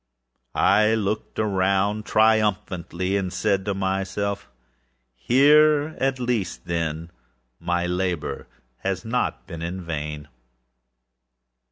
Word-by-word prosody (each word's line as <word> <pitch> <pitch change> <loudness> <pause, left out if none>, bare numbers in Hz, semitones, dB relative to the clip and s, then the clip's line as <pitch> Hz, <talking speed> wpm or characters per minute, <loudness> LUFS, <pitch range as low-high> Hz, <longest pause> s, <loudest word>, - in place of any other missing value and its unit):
I 110 +1 +4
looked 105 0 -3
around 100 +1 +1
triumphantly, 100 -4 +1
and 95 -2 -2
said 100 -2 0
to 100 - -1
myself: 95 +1 -2 0.8
âHere 150 +3 +5
at 135 0 +1
least, 120 -8 -2
then, 85 -1 -3 0.5
my 85 0 -1
labor 90 -2 -2 0.3
has 95 - -3
not 120 -2 -1
been 85 -3 -8
in 90 +2 -4
vain. 75 -2 -5
95 Hz, 95 wpm, -24 LUFS, 90-110 Hz, 0.8 s, âHere